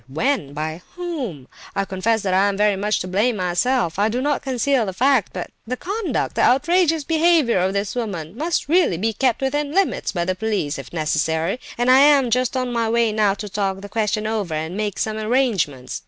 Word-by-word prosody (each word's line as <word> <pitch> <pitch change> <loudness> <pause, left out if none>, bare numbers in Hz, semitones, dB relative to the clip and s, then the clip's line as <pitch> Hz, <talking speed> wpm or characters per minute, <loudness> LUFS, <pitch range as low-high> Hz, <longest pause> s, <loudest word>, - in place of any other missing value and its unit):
When? 155 - -1
By 155 +3 -4
whom? 270 - -5 0.3
I 195 0 0
confess 210 +4 0
that 190 -2 0
I 195 +2 +4
am 195 - -3
very 210 -1 +3
much 205 +2 0
to 185 - -4
blame 210 +6 +1
myself; 185 +1 0
I 210 +2 +3
do 240 +3 -1
not 285 +2 0
conceal 260 -2 0
the 190 - -3
fact; 255 0 +2
but 180 - -6 0.2
the 255 +2 -3
conduct, 385 - -2
the - - 0
outrageous 325 +4 +3
behaviour 320 - +3
of 185 +2 0
this 200 0 -2
woman, 195 -8 -4
must 330 +7 -1
really 335 - +3
be 220 +5 -1
kept 255 +3 0
within 290 +2 -1
limits, 390 -1 +1
by 175 -3 -2
the 185 - 0
police 190 -7 -2
if - - -10
necessary, 160 +5 -1 0.2
and 245 +1 +3
I 260 - +7
am 280 -3 +5
just 255 +1 +1
on 250 -1 -2
my 230 -1 0
way 230 -1 +2
now 210 -2 +2
to 210 - -7
talk 195 -1 -2
the 205 - -9
question 215 0 -1
over 210 -7 -2
and 160 +3 -4
make 210 -1 -2
some 215 0 -2
arrangements. 215 - 0
220 Hz, 210 wpm, -21 LUFS, 185-260 Hz, 0.3 s, I